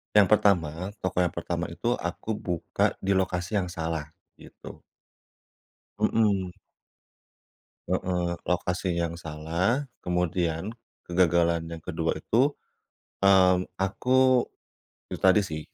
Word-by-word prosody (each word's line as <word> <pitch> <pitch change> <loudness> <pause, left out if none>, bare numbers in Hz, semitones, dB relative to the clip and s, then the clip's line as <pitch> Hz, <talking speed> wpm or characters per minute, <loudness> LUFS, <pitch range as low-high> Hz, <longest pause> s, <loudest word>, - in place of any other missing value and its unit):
Yang 105 -2 +7
pertama, 90 -4 +2
toko 95 -1 -2
yang 90 - 0
pertama - - -3
itu - - -1
aku 110 - -4
buka 85 -5 -1
di 95 - +1
lokasi 95 +1 0
yang 90 - -2
salah, 80 -3 -3 0.3
gitu. - - -12 1.2
Hmm. 105 -3 +2 1.4
Heeh. 90 -1 -1
Lokasi 90 0 -1
yang 85 0 -2
salah, 85 - -1 0.2
kemudian 90 +1 -1 0.3
kegagalan 85 -1 +2
yang 85 -1 -8
ke-2 80 -2 -2
itu, 125 - +1 0.7
mmm 95 -2 +5 0.2
aku. 125 +6 +3 0.7
Itu - - -5
tadi 95 +2 +5
sih 80 -4 -5
90 Hz, 105 wpm, -27 LUFS, 85-100 Hz, 1.4 s, Yang